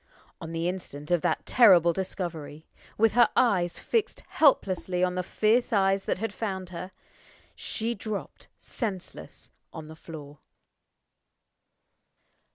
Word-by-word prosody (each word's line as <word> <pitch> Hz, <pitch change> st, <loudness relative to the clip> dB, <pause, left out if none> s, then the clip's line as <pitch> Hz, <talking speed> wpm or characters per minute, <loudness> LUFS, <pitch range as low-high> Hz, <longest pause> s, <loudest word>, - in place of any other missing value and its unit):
On 165 Hz, -, -6 dB
the 165 Hz, +1 st, -2 dB
instant 175 Hz, -5 st, -5 dB
of 175 Hz, -2 st, +3 dB
that -, -, -1 dB
terrible 180 Hz, -8 st, +6 dB
discovery 165 Hz, -5 st, -5 dB, 0.3 s
with 225 Hz, 0 st, +4 dB
her 240 Hz, 0 st, +5 dB
eyes 185 Hz, -9 st, +2 dB
fixed 455 Hz, -3 st, -1 dB
helplessly 185 Hz, -, +2 dB
on 180 Hz, 0 st, +1 dB
the 180 Hz, -, -1 dB
fierce 220 Hz, +6 st, +1 dB
eyes 195 Hz, -2 st, +2 dB
that -, -, -1 dB
had 225 Hz, +1 st, -3 dB
found 190 Hz, -5 st, -4 dB
her 180 Hz, +1 st, -7 dB, 0.6 s
she 230 Hz, +2 st, -3 dB
dropped 215 Hz, -1 st, -6 dB
senseless 200 Hz, -7 st, -6 dB, 0.2 s
on 155 Hz, -1 st, -9 dB
the 160 Hz, -, -10 dB
floor. 150 Hz, -3 st, -11 dB
185 Hz, 125 wpm, -27 LUFS, 170-215 Hz, 0.6 s, terrible